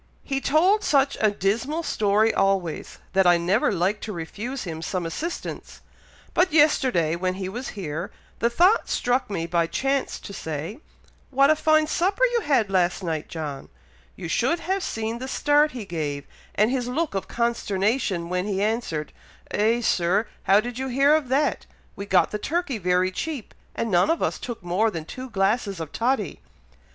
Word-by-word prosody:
"He 270 -1 -2
told 365 +10 +3
such 275 -1 +3
a 215 - +5
dismal 225 - -1
story 215 -3 +2
always, 195 -4 0 0.2
that 190 -1 +4
I 175 -1 +6
never 180 +7 +2
liked 195 +3 0
to 220 - -5
refuse 210 +9 -5
him 160 -4 -6
some 180 +1 -3
assistance; 320 - -5 0.5
but 360 0 +3
yesterday, 260 - +3
when 185 +1 -1
he 190 -1 -4
was 240 +7 -5
here, 170 -1 -4 0.3
the 235 - +2
thought 360 - +3
struck 245 0 0
me 170 -5 -2
by 170 0 +1
chance 270 +8 -1
to 200 - -9
say, 160 - -5 0.5
'What 275 +2 +4
a - - +4
fine 310 0 +3
supper 380 +9 0
you 470 - +2
had 235 - +1
last 185 0 +1
night, 160 -3 -3
John!' 150 -4 -6 0.5
You 175 - -6
should 260 - +1
have 385 +2 -1
seen 225 -5 -3
the 260 - -5
start 295 +3 +2
he 240 -5 -6
gave, 150 -5 -4 0.3
and 215 +3 +3
his 250 -2 -1
look 300 +3 -1
of 195 - -3
consternation, 210 -5 0
when 180 +2 -2
he 195 -2 -1
answered, 205 -8 -2 0.4
'Eh, 225 +3 +2
Sir! 190 0 +2 0.2
how 195 +2 +6
did 240 +2 -4
ye 265 0 -2
hear 275 +4 +4
of 310 -4 +2
that! 275 +4 0 0.3
We 200 - -7
got 190 -2 +3
the 210 - -3
turkey 315 -3 -2
very 180 0 +2
cheap, 285 +3 -5 0.2
and 230 - -2
none 180 - +4
of 330 - +1
us - - -1
took 235 -6 -6
more 185 +6 +1
than 165 -6 -6
two 255 +8 -8
glasses 200 -2 0
of 160 -2 -6
toddy.'" 230 - -1
215 Hz, 180 wpm, -24 LUFS, 180-270 Hz, 0.5 s, I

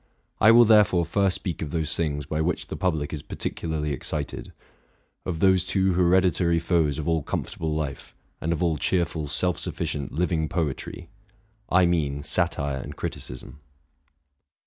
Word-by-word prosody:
I 110 - +6
will 120 +1 +8
there 105 -1 +7
fore 90 -3 0
first 95 +2 +1
speak 90 - -4
of 80 - -3
those 80 0 -1
things 75 -3 -2
by 75 +2 -2
which 85 +2 -1
the - - -4
public 80 -5 -1
is 75 - -4
partic - - -4
ularly 80 -2 -2
excited; 70 +2 -4 0.8
of 85 -3 -3
those 95 -2 +4
two 95 0 +1
hereditary 90 -1 +3
foes 85 -4 +1
of 75 - -4
all 80 -1 +2
comfort - - -4
able 80 -2 -1
life, 75 -3 -5 0.3
and 80 - -1
of 85 +1 0
all 80 -3 +1
cheerful, 85 -1 0
self 90 +5 0
sufficient, 70 -4 -3
living 80 -1 0
poetry, 85 +1 -3 0.6
T 90 0 +5
mean, 75 -5 0
satire 75 -4 0
and - - -7
criticism. 65 +4 -6
80 Hz, 165 wpm, -25 LUFS, 75-90 Hz, 0.8 s, will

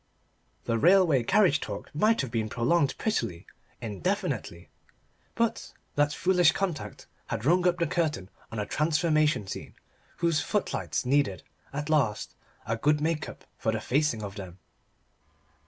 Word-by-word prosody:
The 115 -1 0
railway 175 -4 +5
carriage 160 - +3
talk 100 -1 -7
might 215 +9 +3
have 130 -4 -5
been 110 -2 -1
prolonged 140 +6 +1
prettily, 115 - -2 0.4
indefinitely. 95 -4 -3 0.6
But 230 0 -1 0.2
that 145 0 +2
foolish 180 0 +3
contact 180 -7 -3 0.2
had 110 - -4
rung 180 +4 +4
up 175 0 +2
the 170 - +1
curtain 155 - -1 0.2
on 115 - -5
a 105 - -1
transformation 155 - +1
scene, - - -7 0.4
whose 170 -3 +1
footlights 205 -6 -2
needed, 130 - +1 0.3
at 145 +1 -4
least, 130 -9 +1 0.3
a 115 +1 -1
good 150 +5 +2
make 155 0 -1
up - - -12
for 110 - +1
the 110 - -2
facing 130 -3 0
of 100 -1 -5
them. 95 -3 -8
145 Hz, 140 wpm, -28 LUFS, 115-170 Hz, 0.6 s, railway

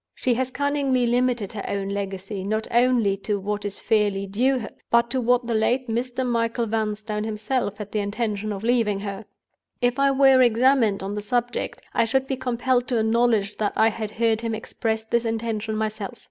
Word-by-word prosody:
She 255 - +1
has 255 +2 -1
cunningly 275 -2 +1
limited 240 -3 +1
her 205 - -5
own 195 -1 -2
legacy, 195 0 -4
not 215 +2 -1
only 235 -4 +3
to 205 +1 -2
what 205 +1 -3
is 200 -1 -4
fairly 205 -3 +1
due 250 +7 +1
her, 225 -4 -6 0.2
but 235 0 +3
to 260 - 0
what 245 +1 +2
the 235 - -1
late 245 +4 +1
Mr. 245 +3 -2
Michael 230 0 0
Vanstone 215 -1 -2
himself 215 0 -2
had 210 -1 -7
the 215 - -1
intention 210 0 -2
of 200 0 -5
leaving 225 -4 +1
her. 200 +1 -5 0.5
If 245 +2 +1
I 275 0 +4
were 270 -1 +5
examined 240 -4 +3
on 195 +1 -3
the 210 - -3
subject, 245 +3 -2
I - - +3
should 265 +3 +1
be 270 - -2
compelled 250 0 0
to 245 - 0
acknowledge 220 -2 +2
that 210 -1 0
I 220 - +4
had 215 -1 -4
heard 225 0 +1
him 230 -1 -2
express 220 0 -3
this 235 +1 0
intention 225 -1 -2
myself. 215 -2 -4
225 Hz, 190 wpm, -24 LUFS, 210-245 Hz, 0.5 s, were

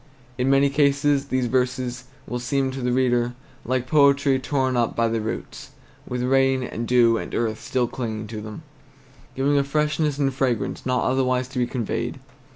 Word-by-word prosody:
In 125 +1 +1
many 135 0 +4
cases 140 0 +2
these 130 -2 0
verses 125 0 -1 0.2
will 125 - -4
seem 130 +2 0
to 135 0 -6
the 125 0 0
reader 120 -1 +1 0.3
like 130 0 -1
poetry 140 -1 +4
torn 130 -1 0
up 120 -2 0
by 115 0 +2
the 115 0 -1
roots, 110 - -6 0.3
with 125 0 -3
rain 135 0 +2
and 120 -1 -4
dew 120 -2 +4
and - - -6
earth 110 -2 -1
still 125 -1 0
clinging 110 -4 -4
to 110 -2 -6
them, 110 +8 -8 0.7
giving 140 +2 +2
a - - +2
freshness 150 +1 0
and 140 -2 +2
a - - -5
fragrance 130 -3 -1
not 125 -1 +1
otherwise 130 -1 +1
to 130 -1 -4
be 120 - +1
conveyed. 120 -3 -3
130 Hz, 180 wpm, -23 LUFS, 120-135 Hz, 0.7 s, many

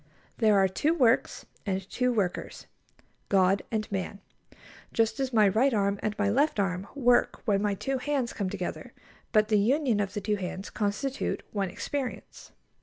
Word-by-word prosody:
There 215 -3 +4
are 195 0 +5
two 295 - 0
works 250 -6 +2 0.2
and 190 -2 -3
two 250 +3 0
workers: 200 -7 -2 0.6
God 195 0 +3
and 215 -1 -1
man. 195 +1 -3 0.7
Just 225 +1 +1
as 265 -1 -1
my 215 -4 +5
right 230 +6 +3
arm 200 -1 +1
and 215 0 -2
my 205 - +1
left 270 +4 +2
arm 190 -1 -1
work 245 -3 +2
when 200 -4 +2
my 205 -1 0
two 270 +6 -2
hands 265 -3 -1
come 200 -3 -2
together, 185 -2 -5 0.4
but 215 -1 +3
the 210 -2 +4
union 250 +1 +2
of 200 -1 -2
the 205 - -2
two 210 +1 0
hands 190 +1 -5
constitute 220 +6 -2
one 200 -3 -1
experience. 255 +7 -5
210 Hz, 170 wpm, -28 LUFS, 195-245 Hz, 0.7 s, are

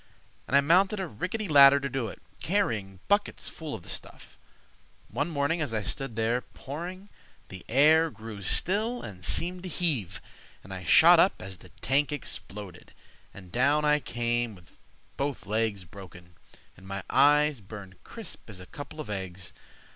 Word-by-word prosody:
And 140 - +4
I - - +6
mounted 190 +7 +3
a 190 - -1
rickety 185 - -4
ladder 140 -2 +8
to 140 - -3
do 135 -3 -2
it, - - -9 0.2
Carrying 110 - -1
buckets 205 +1 +1
full 155 -6 -6
of 95 - -10
the - - -15
stuff. - - -6 0.7
One 145 - -2
morning, 155 +2 0
as 135 -7 -2
I 105 - -1
stood 135 +2 -2
there 115 +3 +1
pouring, 180 +11 -8 0.4
The 95 -2 -9
air 155 +6 +5
grew 110 -4 -9
still 215 - 0
and 95 -4 -9
seemed 180 - -2
to 185 - -6
heave, 125 - 0 0.4
And 95 - -9
I 95 - -6
shot 80 - +7
up - - +4
as 95 -1 -8
the - - -15
tank 140 +3 +2
exploded, 100 -9 -6 0.4
And 90 -3 -13
down 145 +5 +3
I 150 0 +4
came 120 -3 -2
with 90 -3 -19 0.4
both 140 -4 -3
legs 105 -2 -1
broken, 90 -1 -13 0.4
And 95 - -15
my 100 -1 -5
eyes 150 -1 +4
burned 95 -2 -11
crisp 225 - -9
as 100 -4 -9
a 90 - -10
couple 145 +8 -9
of 155 - -5
eggs. 95 -2 -5
125 Hz, 170 wpm, -28 LUFS, 100-155 Hz, 0.7 s, ladder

